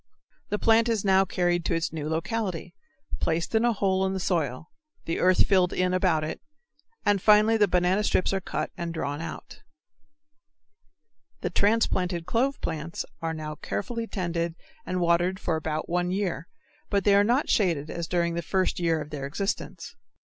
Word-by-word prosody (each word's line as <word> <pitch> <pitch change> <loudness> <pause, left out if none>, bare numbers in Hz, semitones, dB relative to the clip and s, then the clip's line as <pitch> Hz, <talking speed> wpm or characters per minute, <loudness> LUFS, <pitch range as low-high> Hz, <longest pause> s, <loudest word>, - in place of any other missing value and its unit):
The 210 - 0
plant 225 +2 +4
is 220 -3 0
now 190 0 +5
carried 175 -1 0
to 170 - +1
its 165 -1 -2
new 155 -1 -4
locality, 180 +1 -3 0.5
placed 165 +5 -1
in 220 +1 +3
a 240 - +4
hole 190 -3 +1
in 190 0 0
the 190 - -2
soil, 160 -5 -2 0.3
the 165 - -2
earth 185 0 +4
filled 185 -3 +3
in 180 0 +1
about 180 -4 +2
it, 155 - -5 0.6
and 205 -2 +3
finally 215 +2 +5
the 210 -2 +4
banana 180 +3 +2
strips 190 -2 +1
are 195 - 0
cut - - -3
and 170 -1 -4
drawn 145 -1 -3
out. 165 - -8 1.8
The - - -2
transplanted 185 -5 +1
clove 265 +7 0
plants 165 0 -4 0.2
are 165 0 -2
now 155 -1 -5
carefully 230 +8 -4
tended 170 -4 -2 0.3
and 185 - -1
watered 175 +2 +2
for 170 -5 -1
about 155 0 -3
one 175 +1 0
year, 180 -5 -2 0.4
but 200 -2 +1
they 205 - +4
are 200 0 +6
not 245 +7 +2
shaded 165 -7 +1
as 170 -1 -4
during 170 -1 0
the 170 - -2
first 185 +3 0
year 165 -2 +1
of 150 - -8
their 140 -2 -4
existence. 195 +8 -4
180 Hz, 175 wpm, -26 LUFS, 165-200 Hz, 1.8 s, are